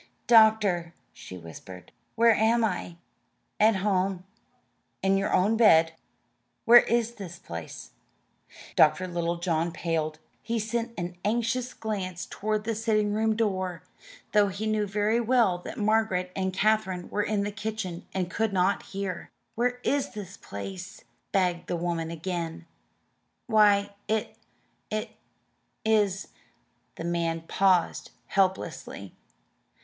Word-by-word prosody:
"Doctor," 215 -7 +4 0.2
she 95 - -10
whispered, 90 +2 -11 0.2
"where 230 0 +6
am 225 +2 +3
I?" 175 -4 -3 0.6
"At 215 0 +5
home, 190 -1 0 0.8
in 195 0 +3
your 195 +1 0
own 210 +5 +3
bed." 165 -8 +6 0.7
"Where 240 +1 +10
is 235 -1 +1
this 190 -7 -9
place?" 80 - -8 0.8
Dr. 155 +4 +4
Littlejohn 170 -1 -1
paled. 160 -2 -2 0.2
He 230 +1 -2
sent 230 +2 -2
an 175 0 -4
anxious 240 +3 -1
glance 185 -5 -4
toward 215 0 -2
the 225 +1 -1
sitting 215 -1 +1
room 220 +1 +1
door, 185 -5 -1 0.5
though 210 -1 +4
he 200 +3 -4
knew 215 -1 0
very 210 +3 +1
well 230 -6 +2
that - - -8
Margaret 210 -4 +1
and 190 -1 -1
Katherine 190 -2 +1
were 210 - 0
in 205 -1 0
the 205 - -2
kitchen 210 -5 -5
and 185 -2 -1
could 225 0 0
not 190 +1 +2
hear. 195 -3 -5 0.2
"Where 245 +1 0
is 285 -1 0
this 195 -3 -7
place?" 190 - -8 0.3
begged 180 -3 0
the 175 - -1
woman 170 -1 -2
again. 170 0 -4 0.8
"Why, 205 -3 +4
it 220 0 -1 0.5
it 215 0 -3 0.7
is 205 -3 +1 0.3
" - - -44
The - - -6
man 170 -1 -1
paused 185 +1 +1 0.2
helplessly. 190 -1 -1
195 Hz, 125 wpm, -27 LUFS, 175-220 Hz, 0.8 s, Where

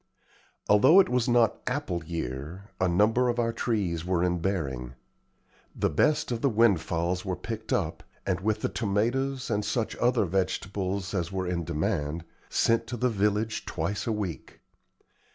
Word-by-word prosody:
Although 105 - +7
it 195 - +5
was 125 0 +1
not 120 -2 +3
"apple 85 -1 -2
year," 80 - -5
a 95 - +3
number 110 +8 +3
of 120 - -1
our 115 -1 +1
trees 100 -8 -1
were 90 -1 +1
in 90 -1 +1
bearing. 65 -10 -2 0.8
The - - 0
best 150 -4 +2
of 115 -1 -2
the 140 - +3
windfalls 90 -6 +2
were 95 -2 -2
picked 110 +1 -6
up, - - 0 0.2
and, 95 -2 0
with 110 +2 -1
the - - 0
tomatoes 120 +5 -1
and 105 -1 +1
such 115 0 -1
other 120 -3 +2
vegetables 95 +1 -2
as 90 -2 -1
were 95 -1 -2
in 90 -2 -2
demand, 75 +2 -2 0.2
sent 115 0 +2
to 120 - -4
the 125 +2 +2
village 105 +1 0
twice 105 +3 -2
a - - +1
week. 100 -6 -5
100 Hz, 160 wpm, -28 LUFS, 90-115 Hz, 0.8 s, Although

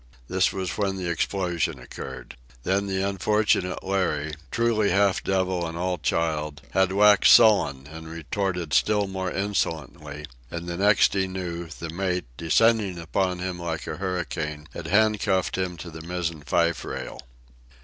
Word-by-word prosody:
This 95 0 +2
was 95 0 -4
when 100 -2 0
the 95 -2 -4
explosion 85 0 -1
occurred. 65 -2 -9 0.3
Then 100 +4 0
the 95 0 0
unfortunate 100 -1 +1
Larry, 85 -6 -1 0.2
truly 115 -3 +1
half 100 +1 +2
devil 95 -2 0
and 80 +1 -6
all 90 0 -1
child, 75 -3 -1
had 95 0 +2
waxed 105 +1 +6
sullen 85 - +5
and 80 +2 -10
retorted 85 0 -3
still 105 -1 +3
more 95 -1 -3
insolently; 80 -7 -3 0.2
and 85 0 -5
the 85 - -3
next 105 +2 +4
he 95 -1 +1
knew, 90 -2 -5
the 80 +1 -7
mate, 90 +1 -1
descending 100 - +2
upon 90 +2 -1
him 90 0 -4
like 85 -2 -4
a - - -5
hurricane, 80 -5 -3
had 85 - -6
handcuffed 100 -1 +2
him 90 -2 -2
to 85 +1 -8
the 80 +1 -8
mizzen 85 -2 -3
fife 85 +1 +1
rail. - - -6
90 Hz, 150 wpm, -25 LUFS, 80-95 Hz, 0.3 s, waxed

